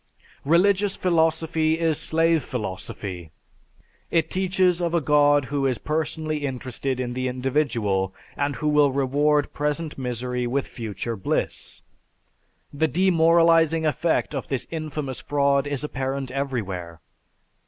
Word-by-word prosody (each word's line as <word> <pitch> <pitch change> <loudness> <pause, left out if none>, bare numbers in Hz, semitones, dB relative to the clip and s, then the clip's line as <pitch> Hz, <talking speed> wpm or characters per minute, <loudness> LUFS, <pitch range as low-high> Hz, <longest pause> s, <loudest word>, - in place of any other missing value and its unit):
"_) - - -34 0.2
Religious 190 +6 +3
philosophy 160 -2 +1
is 165 -2 +1
slave 165 0 +3
philosophy; 95 -6 -6 0.8
it 165 -2 +1
teaches 185 -1 +1
of 170 0 0
a - - +4
God 145 -1 +4
who 140 +1 -1
is 130 -3 0
personally 155 +2 -2
interested 130 -1 -3
in 120 -1 -3
the 130 +1 -2
individual 125 -7 0 0.2
and 145 0 -1
who 135 +6 -3
will 150 -2 +4
reward 145 +2 +1
present 150 +1 -2
misery 125 0 -2
with 135 +3 -1
future 115 -1 -5
bliss. 95 - -3 0.9
The 160 +3 +1
demoralizing 165 -1 +4
effect 155 +1 0
of 135 - -4
this 135 -3 -2
infamous 155 -4 -4
fraud 140 -1 +1
is 145 -1 -2
apparent 135 -2 -3
everywhere. 100 - -4
145 Hz, 125 wpm, -24 LUFS, 130-160 Hz, 0.9 s, a